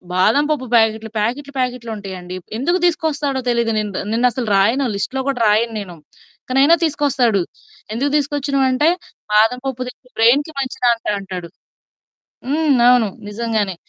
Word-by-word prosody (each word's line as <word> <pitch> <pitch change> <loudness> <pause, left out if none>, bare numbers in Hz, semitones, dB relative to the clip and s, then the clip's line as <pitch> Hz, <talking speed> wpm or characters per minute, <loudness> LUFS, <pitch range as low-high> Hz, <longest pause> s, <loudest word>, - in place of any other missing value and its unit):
బాదం 215 +10 +3
పప్పు 280 -4 -1
ప్యాకెట్లు 220 -1 +2
ప్యాకెట్లు 275 +6 -2
ప్యాకెట్లుంటాయండి. 210 -8 -4 0.2
ఎందుకు 345 +9 +1
తీసుకొస్తాడో 295 -5 0
తెలియదు. 235 -1 +1
నేను, 210 -1 -2 0.2
నేను 235 +3 +3
అసలు 240 0 -4
రాయను 230 +8 +2
లిస్ట్‌లో 265 +6 -2
గూడా 255 -4 -1
రాయను 225 +2 +2
నేను. 180 -4 -8 0.5
కానీ 265 +1 +2
అయినా 330 +4 +6
తీసుకొస్తాడు. 275 - +1 0.5
ఎందుకు 275 +5 -1
తీసుకొచ్చినావంటే 280 0 +1 0.4
బాదం 225 +4 +4
పప్పు 260 -2 -3
తింటే 250 0 -12
బ్రెయిన్‌కి 265 +8 +4
మంచిదంట 250 -3 0
అంటాడు. 185 -3 -7 1.0
హ్మ్. 300 -1 +2
అవును. 245 -3 +5 0.2
నిజంగానే 215 -3 -2
245 Hz, 130 wpm, -19 LUFS, 220-275 Hz, 1.0 s, అయినా